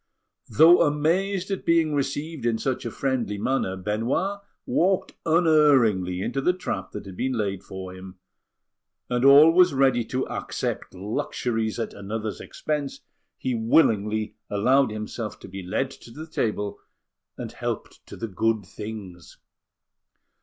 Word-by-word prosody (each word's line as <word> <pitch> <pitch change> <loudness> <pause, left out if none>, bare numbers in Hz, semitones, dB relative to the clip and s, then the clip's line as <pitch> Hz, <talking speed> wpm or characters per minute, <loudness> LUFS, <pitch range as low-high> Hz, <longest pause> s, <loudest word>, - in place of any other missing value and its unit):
Though 165 +4 +7
amazed 180 +6 +1
at 195 - -2
being 165 -2 +3
received 145 +2 -2
in 115 -1 +1
such 125 +1 -2
a - - -4
friendly 120 -7 -1
manner, 100 -4 -1
Benoit 115 - -1 0.3
walked 185 +1 +1 0.2
unerringly 140 - +4
into 135 - -2
the 180 - +3
trap 180 - -4
that - - -6
had 95 -2 -9
been 130 +6 -1
laid 100 -5 -2
for 95 -1 -8
him; 95 0 -11 0.9
and, 125 0 +1
always 155 +4 +7
ready 130 -3 +3
to 130 +2 -2
accept - - -4
luxuries 110 +1 -2
at 115 - -3
another's 105 0 -5
expense, 150 -3 -4 0.4
he 130 - -2
willingly 110 -3 +2 0.2
allowed 125 +7 +3
himself 110 0 -5
to - - -10
be 95 +1 -7
led 115 +9 -2
to 120 - -14
the 150 +7 -8
table 105 -9 -2 0.6
and - - -6
helped - - -5
to - - -10
the 115 - -4
good 110 +1 0
things. 100 -4 -9
120 Hz, 140 wpm, -25 LUFS, 105-150 Hz, 0.9 s, Though